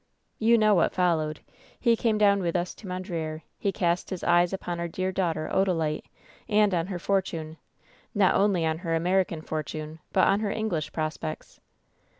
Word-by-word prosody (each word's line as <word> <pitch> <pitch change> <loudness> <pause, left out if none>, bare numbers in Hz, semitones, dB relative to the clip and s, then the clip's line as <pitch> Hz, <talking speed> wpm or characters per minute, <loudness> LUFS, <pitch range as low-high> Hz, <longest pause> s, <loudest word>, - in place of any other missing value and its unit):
"You 230 +1 +5
know 215 -1 +4
what 175 - +2
followed. 160 -4 +1 0.4
He 235 -2 +4
came 225 -1 +1
down 200 -1 +4
with 170 -1 -1
us 175 0 -1
to 205 - -12
Mondreer. 170 -4 -4 0.2
He 200 - 0
cast 175 -1 0
his 185 -3 -5
eyes 175 0 +4
upon 175 -3 -4
our 170 - -2
dear 185 +2 -2
daughter, 165 -4 -1
Odalite, 165 -5 +1 0.4
and 210 -2 +4
on 170 -1 0
her 190 -2 -4
fortune 165 -4 -2 0.3
— - - -32
not 200 -2 +4
only 195 -4 +2
on 160 0 0
her 165 -2 -1
American 175 -1 +1
fortune, 155 0 -5
but 185 - +4
on 195 - +3
her 215 -1 -1
English 200 -8 -2
prospects. 155 0 -4
175 Hz, 175 wpm, -27 LUFS, 160-195 Hz, 0.4 s, You